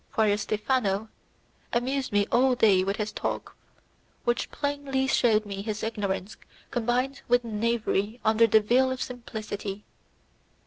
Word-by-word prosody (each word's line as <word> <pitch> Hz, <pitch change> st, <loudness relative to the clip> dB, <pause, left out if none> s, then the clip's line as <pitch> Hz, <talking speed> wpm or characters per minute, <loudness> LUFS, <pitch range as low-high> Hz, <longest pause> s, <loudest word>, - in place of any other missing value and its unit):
Friar 220 Hz, -5 st, +2 dB
Stephano 210 Hz, 0 st, 0 dB, 0.6 s
amused 260 Hz, +3 st, 0 dB
me 205 Hz, 0 st, +3 dB
all 255 Hz, +1 st, +4 dB
day 200 Hz, -6 st, +4 dB
with 195 Hz, +1 st, -1 dB
his 210 Hz, 0 st, -2 dB
talk, -, -, -4 dB, 0.7 s
which 240 Hz, 0 st, 0 dB
plainly 285 Hz, -2 st, -1 dB
showed 220 Hz, -5 st, +3 dB
me 200 Hz, -1 st, -5 dB
his 215 Hz, 0 st, -4 dB
ignorance 205 Hz, -3 st, -3 dB, 0.3 s
combined 245 Hz, +3 st, 0 dB
with 245 Hz, 0 st, +3 dB
knavery 225 Hz, -1 st, -1 dB
under 220 Hz, +1 st, +5 dB
the 220 Hz, 0 st, +5 dB
veil 250 Hz, +5 st, +3 dB
of 260 Hz, 0 st, -3 dB
simplicity. 215 Hz, -5 st, -5 dB
225 Hz, 130 wpm, -27 LUFS, 210-250 Hz, 0.7 s, under